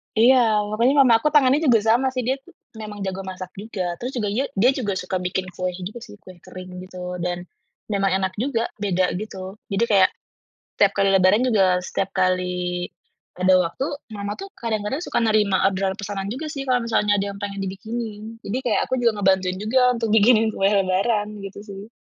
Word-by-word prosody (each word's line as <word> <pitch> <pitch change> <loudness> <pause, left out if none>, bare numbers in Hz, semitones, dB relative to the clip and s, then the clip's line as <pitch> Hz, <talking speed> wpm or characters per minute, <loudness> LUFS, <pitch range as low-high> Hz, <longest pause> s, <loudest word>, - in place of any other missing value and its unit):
Iya. 225 -2 +5
Makanya 235 +5 +3
mama 240 -3 +5
aku 300 - 0
tangannya 280 0 +5
juga 235 -4 +5
sama, 235 +4 +3
sih. 255 -1 -2
Dia 260 +3 +1
tuh, - - -20 0.2
memang 210 -2 -7
jago 190 0 -3
masak 185 -1 -7
juga. 185 -5 -4
Terus 250 +2 -4
juga 215 -4 -1
ia 260 +6 0
dia 240 +7 +4
juga 220 -7 -2
suka 185 0 -2
bikin 185 +1 -2
kue 185 0 -3
gitu 190 +5 -7
sih, 215 -3 -12
kue 185 -2 -13
kering 185 0 -9 0.2
gitu. 180 -1 -7
Dan, 175 0 -3 0.5
memang 195 -1 +1
enak 190 -1 -1
juga, 235 -1 -1
beda 185 -3 +1
gitu. 190 -1 -6 0.2
Jadi 195 +4 +1
kayak, 195 -3 +5 0.7
tiap 200 -1 +5
kali 195 - +2
lebaran 195 +5 +4
juga, 190 -7 +3
setiap 195 +1 -2
kali 180 -1 0 0.5
ada 185 +1 +2
waktu, 175 +10 -1 0.3
mama 200 0 -4
tuh, 390 - -6
kadang-kadang 230 +6 -3
suka - - -1
nerima 210 -4 +3
orderan 190 0 0
pesanan 200 -1 -4
juga, 305 +6 -5
sih 275 -3 -5
kalau 255 -2 +2
misalnya 210 -2 +2
ada 200 - -1
yang - - -11
pengen 200 -1 -5
dibikinin. 220 +3 -6
Jadi 220 +6 -3
kayak 245 - +1
aku 260 - 0
juga 220 -3 +2
ngebantuin 190 -1 +2
juga, 250 +4 +3
untuk 230 -1 -2
bikinin 220 +1 +5
kue 195 - +2
lebaran. 200 +2 +1 0.2
Gitu 195 0 -8
sih. 200 +1 -10
205 Hz, 190 wpm, -22 LUFS, 185-230 Hz, 0.7 s, Iya